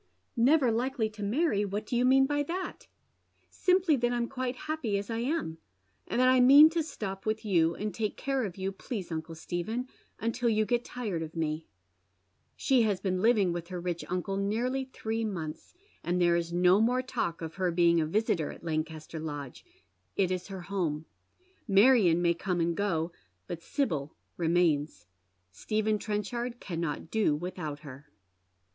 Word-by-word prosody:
" - - -46
Never 260 +1 +4
likely 235 -1 -1
to 215 0 -11
marry! 210 +1 +1
what 205 +1 -3
do 240 - -3
you 245 +1 +3
mean 270 +1 +5
by 290 +1 0
that? 355 +6 -5 0.2
" - - -45
" - - -41
Simply 365 -4 +3
that 240 0 +1
I'm 240 -1 0
quite 255 -1 -3
happy 290 -10 -1
as 200 +3 -4
I 225 - -1
am, 245 - -2 0.5
and - - -1
that 255 - +5
I 255 0 +5
mean 285 +5 +9
to 335 0 0
stop 210 -10 -6
with 220 0 -1
you, 170 -5 +3
and 210 0 -3
take 215 -2 -2
care 270 -2 -1
of 195 -4 -5
you, 190 0 -2
please 195 -2 -6
uncle 160 0 -4
Stephen, 180 +10 -3 0.3
until 230 +1 0
you 215 -1 +2
get 240 +1 0
tired 215 -11 -4
of 160 0 -6
me." 155 -1 -2 0.9
She 260 -3 +3
has 210 -4 +1
been 185 -2 -1
living 210 -6 +3
with 170 -1 -5
her 180 -1 -5
rich 175 -1 -3
uncle 180 +2 -2
nearly 240 +7 -1
three 225 -3 -3
months, 170 - -5 0.3
and 175 +1 0
there 175 -1 +4
is 170 0 -1
no 180 +3 +4
more 250 +3 +2
talk 170 -9 -3
of 160 0 -5
her 185 -2 +1
being 170 -1 +4
a 155 - 0
visitor 170 -3 0
at - - -13
Lancaster 155 0 -3
Lodge. 145 -4 -6 0.5
It 190 -2 +1
is 185 -1 -3
her 190 -2 -7
home. 170 -5 -2 0.6
Marion 200 -5 +5
may 170 0 +4
come 175 +1 -2
and 170 0 +1
go, 170 -4 0 0.3
but 170 -1 -6
Sibyl 160 - -2 0.2
remains. 160 - +1 0.5
Stephen 215 - -1
Trenchard 235 +4 -3
cannot 165 -3 -4
do 215 -9 +2
without 155 -3 -5
her. 140 -1 -11
200 Hz, 180 wpm, -29 LUFS, 170-240 Hz, 0.9 s, mean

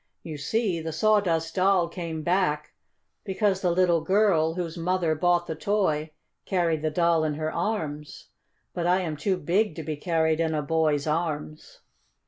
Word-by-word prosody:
"You 160 - -6
see, 190 +2 -1
the 160 0 -4
Sawdust 165 -3 +1
Doll 185 -2 +3
came 170 -2 -5
back 170 -4 0 0.5
because 195 -1 0
the 180 - +1
little 175 -1 +3
girl, 165 -3 +2
whose 175 -2 -4
mother 175 -1 0
bought 175 +2 +2
the 160 - -4
toy, 160 -4 0 0.3
carried 170 -5 0
the 155 - 0
Doll 170 0 +2
in 155 -2 -1
her 155 +1 -3
arms. 155 -6 -4 0.4
But 175 -1 -2
I 180 +1 +3
am 160 -4 -3
too 185 +5 -1
big 180 +3 0
to 160 - -6
be 155 +1 -3
carried 160 0 +1
in 160 -1 0
a 150 - -1
boy's 155 -1 +1
arms." 155 -1 -3
165 Hz, 165 wpm, -26 LUFS, 155-185 Hz, 0.5 s, Doll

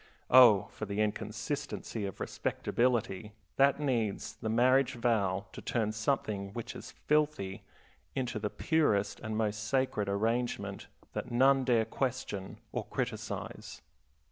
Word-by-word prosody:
Oh, 120 -7 +8
for 110 - -6
the 100 +1 -3
inconsistency 110 +1 -2
of 95 - -8
respectability, 115 -4 -1 0.2
that 140 +1 +4
needs 120 -8 -1
the 110 - -3
marriage 130 +4 +4
vow 105 -5 +1
to - - -8
turn 110 -3 0
something 110 -3 -1
which 120 -1 -6
is - - -9
filthy 150 -11 +1 0.5
into 125 -3 -2
the 105 0 -2
purest 125 -12 +1
and 110 -1 -4
most 105 -1 -1
sacred 110 -4 0
arrangement 105 -1 -1 0.3
that - - -4
none 135 +2 +4
dare 120 -3 +3
question 120 -5 -3
or - - -2
criticize. - - -5
115 Hz, 125 wpm, -31 LUFS, 105-130 Hz, 0.5 s, Oh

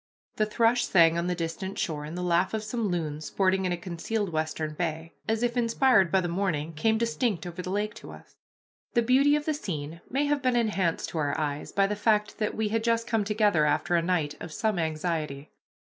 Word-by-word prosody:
The 215 - +2
thrush 230 +2 +2
sang 165 -3 +5
on 170 +1 -1
the 180 - 0
distant 175 +4 -4
shore, 150 -3 -2
and 160 +4 -6
the 180 - -3
laugh 180 +4 +2
of 215 - -3
some 220 0 -2
loons, 155 -4 -3
sporting 190 -1 +1
in 180 - 0
a 175 - -1
concealed 185 +4 -3
western 155 -1 -2
bay, 160 0 -3 0.2
as 225 +1 +1
if 240 0 0
inspired 230 -5 +3
by 190 - +4
the 175 - -2
morning, 170 -4 -1
came 220 +8 +1
distinct 230 -5 -1
over 175 +1 -6
the 180 - -6
lake 210 +2 -1
to - - -11
us. - - -14 0.6
The 235 - +4
beauty 270 +5 +4
of 300 0 -2
the 310 - +1
scene 165 - -5
may 275 +4 +1
have 290 -1 +1
been 255 -2 +1
enhanced 205 -8 0
to 165 - -3
our 145 -1 0
eyes 145 -1 -3
by 195 - +3
the 205 +1 -1
fact 210 +1 +1
that 215 - -1
we 220 -1 0
had 225 +1 0
just 230 0 +1
come 225 -3 +1
together 205 -7 +2
after 175 +4 +1
a 170 - +3
night 165 -4 0
of 165 - -7
some 200 +5 -1
anxiety. 155 -3 -2
190 Hz, 220 wpm, -27 LUFS, 165-225 Hz, 0.6 s, sang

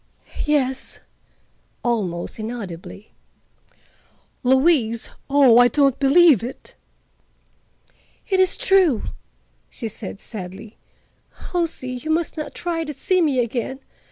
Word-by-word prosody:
"Yes," 265 -3 0 0.9
almost 205 -7 -2
inaudibly. 210 -3 -7 1.3
"Louise! 260 -3 +2 0.2
Oh, 270 -4 +6
I 245 - +7
don't 275 0 +2
believe 285 - +6
it." 250 +3 -8 1.5
"It 380 -3 +1
is 375 -1 +3
true," 380 - +3 0.7
she 230 - -5
said 210 -2 -6
sadly. 205 +1 -8 0.8
"Halsey, 335 -8 -1
you 255 +5 -6
must 325 0 0
not 305 - -6
try 335 -2 -2
to 300 -1 -6
see 365 +7 +1
me 295 -5 +1
again. 240 +3 -3
265 Hz, 100 wpm, -21 LUFS, 225-315 Hz, 1.5 s, I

